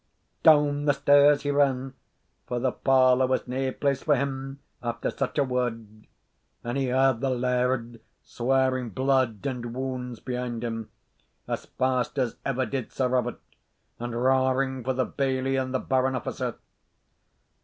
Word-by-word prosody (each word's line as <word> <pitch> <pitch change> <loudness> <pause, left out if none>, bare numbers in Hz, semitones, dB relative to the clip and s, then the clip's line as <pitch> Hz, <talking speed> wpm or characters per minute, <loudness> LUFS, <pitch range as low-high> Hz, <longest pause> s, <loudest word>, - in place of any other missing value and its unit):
Down 145 -2 +5
the 145 - +4
stairs 145 +1 +5
he 145 - 0
ran 135 -2 +1 0.5
(for 125 - -2
the 130 +1 +1
parlour 130 -1 +4
was 130 0 -1
nae 130 +1 -1
place 140 +1 -1
for 150 - +3
him 135 0 -3 0.2
after 120 -1 -2
such 135 +2 -3
a 145 - +4
word), 115 -4 -3 0.6
and 120 +1 -3
he 135 -1 0
heard 130 -1 +2
the 135 - +1
laird 125 -2 -1 0.2
swearing 130 0 0
blood 130 -2 0
and 120 -3 -4
wounds 125 -2 -4
behind 125 -2 -4
him, 115 -2 -4 0.6
as - - -4
fast 130 0 -1
as 125 -3 0
ever 130 -1 0
did 135 -2 -4
Sir 130 -2 0
Robert, 125 -1 0 0.6
and 120 0 -4
roaring 130 0 +1
for 130 +2 0
the 130 0 0
bailie 135 -1 -1
and 130 -1 -1
the 130 - +1
baron 130 0 0
officer. 125 - -3
130 Hz, 150 wpm, -26 LUFS, 125-135 Hz, 0.6 s, Down